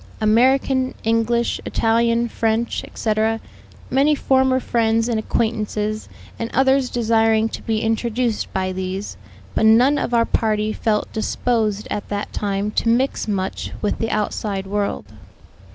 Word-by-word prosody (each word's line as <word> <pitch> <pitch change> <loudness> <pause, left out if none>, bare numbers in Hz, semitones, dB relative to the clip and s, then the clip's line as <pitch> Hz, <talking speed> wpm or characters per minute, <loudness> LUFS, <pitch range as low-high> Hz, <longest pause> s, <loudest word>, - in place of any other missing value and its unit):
American, 260 +4 +2
English, 230 +1 +1
Italian, 230 +1 +1
French, 225 0 -1
etc.; 220 0 -1 0.5
many 280 +3 +3
former 265 -2 +2
friends 225 -2 +1
and 230 -2 0
acquaintances 215 -1 -2 0.3
and 230 - -3
others 265 0 +3
desiring 225 -1 +2
to - - -7
be 220 -1 -1
introduced 225 0 -1
by 185 0 -1
these; 190 +2 -4 0.4
but 220 - +3
none 250 +6 +5
of - - -2
our 230 -1 +3
party 215 -1 0
felt 215 -2 -1
disposed 220 -2 -1
at 205 - -4
that 205 0 -4
time 200 0 -2
to 230 - 0
mix 255 +2 +1
much 195 -2 -3
with 210 - -1
the 225 - -1
outside 205 -2 -2
world. 200 +1 -2
225 Hz, 135 wpm, -21 LUFS, 215-235 Hz, 0.5 s, none